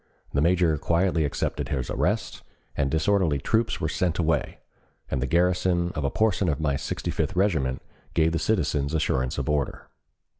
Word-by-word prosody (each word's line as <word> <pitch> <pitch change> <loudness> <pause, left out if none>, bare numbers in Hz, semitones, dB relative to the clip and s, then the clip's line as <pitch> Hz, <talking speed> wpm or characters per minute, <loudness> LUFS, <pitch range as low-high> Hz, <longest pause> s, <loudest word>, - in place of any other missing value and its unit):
The 70 - +2
major 85 -2 +3
quietly 85 -1 +1
accepted 70 - -2
his 65 -3 -2
arrest, - - -1 0.3
the 70 - +1
disorderly 80 +2 +2
troops 110 - 0
were - - -1
sent 90 -3 -1
away, 80 -5 0 0.5
and 65 - 0
the 65 - 0
garrison 90 +2 +2
of 75 - -4
a 70 - +1
portion 100 0 +1
of 70 - -1
my 75 -3 +1
Sixty - - -3
fifth 95 - -2
Regiment 80 -10 +1 0.3
gave 80 0 +3
the 85 - 0
citizens 80 -8 0
assurance 65 -4 0
of - - -2
order. 75 -3 -2
80 Hz, 165 wpm, -26 LUFS, 70-90 Hz, 0.5 s, major